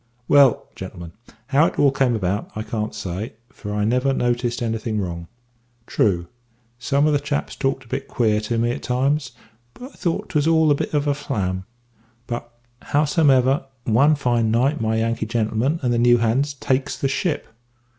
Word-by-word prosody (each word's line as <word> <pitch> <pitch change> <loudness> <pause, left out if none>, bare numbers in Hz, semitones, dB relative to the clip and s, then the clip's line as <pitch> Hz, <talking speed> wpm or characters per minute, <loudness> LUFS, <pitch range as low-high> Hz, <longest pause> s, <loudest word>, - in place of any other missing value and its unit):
"Well, 140 -4 +5
gentlemen, 85 -1 -8 0.4
how 145 +4 +4
it - - -6
all 140 -2 +4
came 135 -3 +1
about, 100 -1 -2
I 110 - -3
can't 110 -1 -4
say, 95 +5 -5 0.2
for 105 - -8
I 105 0 -1
never 125 +4 +2
noticed 120 -1 -1
anything 115 -1 -2
wrong. 85 -3 -4 0.6
True, 90 -7 +1 0.5
some 140 +4 +1
of 155 - +3
the 145 - +3
chaps 145 0 -3
talked 135 -1 -1
a - - -19
bit 135 +3 -4
queer 110 -3 +1
to 115 +2 -2
me 120 +1 +1
at - - -5
times; 135 +4 0 0.4
but - - -12
I 265 - -9
thought 170 -3 -2
'twas 150 0 +1
all 160 -2 +4
a - - +7
bit 145 - -2
of 145 0 +1
a 145 - +2
flam; 95 -10 -3 0.6
but, 120 0 -5 0.4
howsomever, 140 -3 +3 0.2
one 140 +7 +4
fine 120 -5 +1
night 125 +5 +1
my 110 0 0
Yankee 115 0 -1
gentleman 115 +6 0
and 120 -1 +1
the 120 - +1
new 120 0 +5
hands 130 +5 0
takes 130 0 -1
the 135 - 0
ship. 155 +5 -1
125 Hz, 180 wpm, -22 LUFS, 110-140 Hz, 0.6 s, a